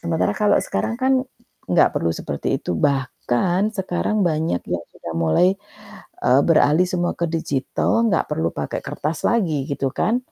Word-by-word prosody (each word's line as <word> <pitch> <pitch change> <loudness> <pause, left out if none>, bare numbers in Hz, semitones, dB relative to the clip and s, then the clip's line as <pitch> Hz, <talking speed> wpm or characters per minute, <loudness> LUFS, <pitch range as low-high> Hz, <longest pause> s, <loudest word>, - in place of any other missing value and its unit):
sementara 165 -1 0
kalau 210 -1 +3
sekarang 230 - -2
kan 260 +1 +1 0.6
nggak - - +4
perlu 85 - +1
seperti - - -2
itu, - - -3
bahkan 140 - 0
sekarang 190 +1 -1
banyak 160 - 0
yang 85 -1 -2
sudah 85 - -8
mulai, 80 - +3 0.8
eee, 125 +2 +5
beralih 165 +2 +4
semua 175 -1 -1
ke 170 -1 -1
digital, 165 - 0
nggak 185 -6 +1
perlu 80 +1 0
pakai - - -4
kertas 155 +2 -4
lagi, 165 -12 +1
gitu 140 -1 -1
kan. 230 +3 +1
165 Hz, 150 wpm, -21 LUFS, 135-190 Hz, 0.8 s, eee